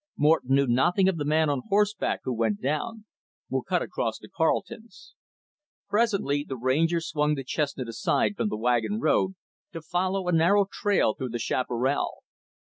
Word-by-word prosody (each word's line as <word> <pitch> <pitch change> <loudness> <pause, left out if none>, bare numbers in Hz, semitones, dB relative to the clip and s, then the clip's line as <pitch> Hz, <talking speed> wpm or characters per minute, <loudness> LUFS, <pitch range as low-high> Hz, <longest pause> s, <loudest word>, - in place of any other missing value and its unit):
Morton 150 -3 +3
knew 140 0 +3
nothing 155 +10 +3
of 190 -3 +1
the 145 - -2
man 155 +2 +2
on 140 -3 0
horseback 210 +1 +1
who 130 - -2
went 110 -3 0
down. 210 - -3 0.5
We'll - - 0
cut - - -1
across - - -3
to - - -13
Carleton's." 295 +7 -3 0.8
Presently, 200 -10 +1
the 135 -3 -6
Ranger 155 +8 +1
swung 150 -2 0
the 135 - -5
chestnut 140 -1 -2
aside 115 - 0
from 210 - -1
the - - -3
wagon 120 - 0
road, 190 -4 +1 0.4
to 165 - -5
follow 185 +3 -1
a - - +2
narrow 175 +5 +4
trail 200 - +1
through 130 - -5
the 120 - -3
chaparral. 125 +3 -1
155 Hz, 165 wpm, -26 LUFS, 130-195 Hz, 0.8 s, narrow